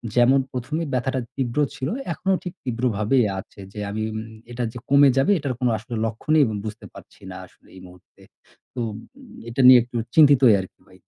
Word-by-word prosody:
যেমন 125 +3 +4
১ম 130 +4 -5
এ - - -4
ব্যথাটা 130 +1 -1 0.2
তীব্র 130 0 -2 0.2
ছিল 135 0 -4 0.3
এখনো 190 +4 -1
ঠিক 180 - -6
তীব্রভাবেই 120 -1 0
আছে। 95 - -13
যে - - -8
আমি 105 +2 -4
উম 110 - -4 0.3
এটা 120 +1 -4
যে 125 - -10
কমে 140 0 +6
যাবে 135 +9 +3
এটার 140 -3 -3
কোন 125 - 0
আসলে 115 +3 -8
লক্ষণই 150 +8 +1
এবং 110 -3 -3
বুঝতে 110 0 -7
পারছি - - -16
না 90 - -8
আসলে - - -25
এই 95 - -12
মুহূর্তে। 90 0 -20 0.5
তো 130 - -7
উম 105 - -8 0.5
এটা 120 +3 -1
নিয়ে 130 -1 +9
একটু 120 +1 -15 0.2
চিন্তিতই 140 -7 +6
আর 95 - -4
কি - - -61
ভাই। - - -19
125 Hz, 200 wpm, -22 LUFS, 110-135 Hz, 0.5 s, নিয়ে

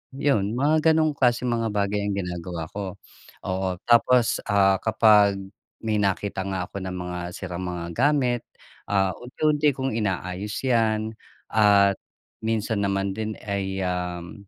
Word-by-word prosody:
'yon. 120 -7 +1
Mga 155 +4 +3
gano'ng 155 -1 +3
klaseng 125 -1 +2
mga 115 -1 0
bagay 100 0 0
ang 100 - -1
ginagawa 90 -2 -4
ko. 100 -2 -5 0.5
Oo. 95 0 -1
Tapos, 120 0 +4
ah, 100 -2 +4
kapag 105 -2 +5 0.5
may 110 -1 0
nakita 100 -1 -1
nga 95 -2 -2
ako - - -9
ng 95 -1 -4
mga 90 0 -5 0.2
sirang 95 -1 -5
mga 90 -1 -4
gamit, 130 -3 +2 0.5
ah, 95 -2 +2
unti-unti 150 +4 +1
kong 135 0 -2
inaayos 95 -1 -2
'yan 110 -4 +1 0.4
at 100 -2 +5 0.5
minsan 110 -1 -1
naman 100 0 0
din 110 -1 -3
ay, 95 -1 -2
um, 90 +2 -4
100 Hz, 135 wpm, -24 LUFS, 95-115 Hz, 0.5 s, kapag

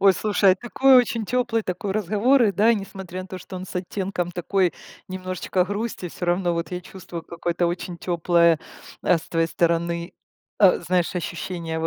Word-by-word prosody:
Ой, 195 -1 +7
слушай, 200 -2 +3
такой 255 +5 +4
очень 235 -3 +2
теплый 235 -1 0
такой 190 +1 -3
разговор, 215 +6 +3
и 205 -3 +3
да, 215 +5 +4
несмотря 190 -2 -6
на 185 - -12
то, 185 - -6
что 185 - -11
он 185 - -6
с - - -10
оттенком 180 -1 -3
такой 180 +1 +1 0.4
немножечко 185 0 -1
грусти, 205 -2 -4
всё 175 - -6
равно 175 0 +1
вот 170 +2 -3
я 180 - -3
чувствую 175 -2 -9
какое-то 170 +1 -2
очень 175 0 -3
теплое, 170 -2 +3 0.4
а, 180 -2 +3
с - - -12
твоей 165 -1 +1
стороны, 170 +1 0 0.5
а, 195 -3 +6
знаешь, 175 +1 0
ощущение 170 -1 -4
в 160 - -1
185 Hz, 175 wpm, -24 LUFS, 170-200 Hz, 0.5 s, Ой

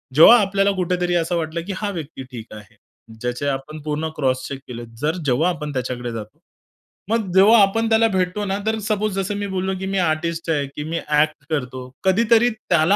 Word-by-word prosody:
जेव्हा 225 +11 +9
आपल्याला 195 0 +2
कुठेतरी 180 -1 0
असं 170 0 0
वाटलं, 165 +1 -3
की 200 - -3
हा 210 0 -2
व्यक्ती 155 -6 -7
ठीक 115 -2 -9
आहे. 105 -3 -13 0.5
ज्याचे 125 +3 -2
आपण 140 +3 -3
पूर्ण 150 +1 -2
क्रॉसचेक 130 -1 -1
केले, 120 -1 -7 0.2
जर 155 +3 +1
जेव्हा 145 +7 +2
आपण 150 -4 -4
त्याच्याकडे 125 -1 -3
जातो, 110 -2 -8 0.7
मग 225 -5 0
जेव्हा 205 +4 +7
आपण 225 +3 +2
त्याला 225 0 +4
भेटतो 185 +1 -1
ना, 195 0 -1
तर 220 0 +1
सपोज 215 -1 -1
जसं 195 +2 -2
मी 205 0 -3
बोललो, 190 0 -2
की 190 - -4
मी 195 0 -1
आर्टिस्ट 165 0 -1
आहे, 145 -2 +1
की 150 - -4
मी 165 +2 -3
ॲक्ट 150 -1 +1
करतो. 130 -4 -3
कधीतरी 230 +5 +4
त्याला 200 -4 +2
170 Hz, 190 wpm, -21 LUFS, 145-195 Hz, 0.7 s, जेव्हा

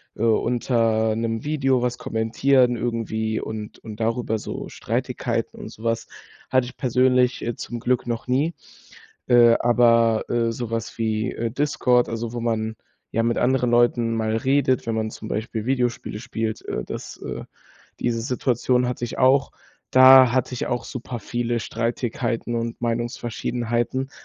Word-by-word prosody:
äh, 115 - -3
unter 115 -1 +2
'nem 115 0 -2
Video 135 -4 +1
was 125 0 -1
kommentieren 125 +3 +2
irgendwie 110 -2 -2
und 110 -1 -6
und 110 -1 -10
darüber 115 -1 0
so - - -6
Streitigkeiten - - -3
und - - -7
so 110 - -13
was, 115 -1 -1 0.4
hatte 130 -1 +3
ich 125 - -10
persönlich, 125 -1 +2
äh, 120 -1 -2
zum 120 -1 -6
Glück 125 +1 0
noch 120 0 -3
nie. 140 +7 +1 0.8
Äh, 120 -1 +6
aber, 115 -2 +3
äh, 115 -1 +1
so 115 0 -5
was 115 0 -4
wie, 110 +1 -1
äh, 115 0 -3
Discord, 125 -2 +2
also 115 0 -4
wo 120 - -4
man 110 -1 -1 0.4
ja 115 - +1
mit 115 0 +1
anderen 125 -1 +2
Leuten 120 -1 +3
mal 110 0 0
redet, 130 0 +1
wenn 115 - -1
man 110 0 -1
zum - - -9
Beispiel 110 0 -3
Videospiele 125 -4 -1
spielt, 115 -3 -3
äh, - - -2
das, - - -7
äh - - -5 0.6
diese 115 -1 0
Situation 125 0 +1
hatte 120 -1 -3
ich - - -7
auch. 135 +2 +4 0.4
Da 130 -1 +8
hatte 130 0 0
ich - - -3
auch 120 - -2
super 125 -1 -6
viele 120 +1 -2
Streitigkeiten 115 +1 -2
und 115 0 -3
Meinungsverschiedenheiten, 120 +2 -2
120 Hz, 155 wpm, -23 LUFS, 115-125 Hz, 0.8 s, Da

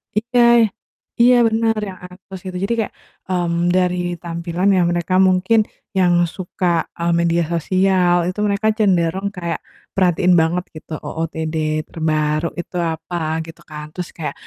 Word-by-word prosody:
iya, 235 0 +4 0.5
iya, 245 +1 +6
bener, 225 0 +1
yang 190 -3 -6
ansos 185 +1 -11
jadi 185 +4 -2
kayak, 215 - -2 0.3
mmm, 175 -1 0
dari 180 -1 +1
tampilan 170 +2 -2
ya 185 - +3
mereka 175 +1 -1
mungkin 185 +5 +3 0.4
yang 180 -2 +4 0.2
suka, 175 -2 -1
eee, 170 0 +1
media 170 0 +2
sosial 185 +1 +2
itu 185 - -6
mereka 205 +2 0
cenderung 190 -2 +1
kayak 170 -2 -3 0.3
perhatiin 180 -1 +3
banget 170 +2 0
gitu, 155 +1 -9
OOTD 160 0 -4 0.3
terbaru 155 0 0
itu 175 - -7
apa, 165 +1 -3 0.3
gitu 165 0 -12
kan, 150 -1 -7
terus 180 0 -5
kayak 160 - -4
180 Hz, 135 wpm, -19 LUFS, 170-190 Hz, 0.5 s, iya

